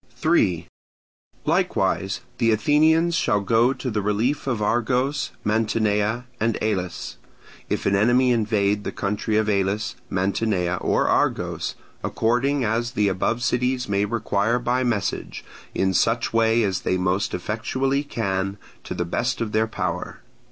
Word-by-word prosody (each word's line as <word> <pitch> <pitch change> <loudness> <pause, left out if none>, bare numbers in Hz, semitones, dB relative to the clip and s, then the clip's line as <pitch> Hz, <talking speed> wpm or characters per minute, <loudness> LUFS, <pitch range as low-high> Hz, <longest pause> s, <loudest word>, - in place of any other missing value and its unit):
3. 95 - +1 0.8
Likewise 95 +6 0 0.2
the 115 -1 +3
Athenians 155 +9 +3
shall 105 -10 +2
go 115 +5 +3
to 130 -2 -4
the 105 -1 -1
relief 110 +9 0
of 120 -5 0
Argos, 125 +6 0
Mantinea, 110 +1 +1
and 115 +1 +1
Elis, 95 -5 -3 0.5
if - - -2
an 100 - +3
enemy 120 +5 +4
invade 105 -3 +1
the - - -3
country 105 +2 -1
of 110 -1 +1
Elis, 100 +1 0
Mantinea, 95 -1 0
or - - +1
Argos, - - 0 0.3
according 125 +4 +1
as 120 +3 -1
the 105 -4 +2
above 110 +6 -1
cities 125 0 0
may 100 0 +1
require 110 +1 0
by 125 +1 0
message, 110 -5 -2 0.3
in 95 0 +1
such 115 +6 +1
way 115 0 +3
as 95 -3 -1
they 95 - 0
most 90 +2 0
effectually 130 +8 -1
can, 100 -7 -2 0.3
to - - -6
the 90 - -1
best 120 +9 -1
of 115 -2 -2
their 110 +1 +2
power. 90 -5 -4
110 Hz, 140 wpm, -23 LUFS, 100-120 Hz, 0.8 s, enemy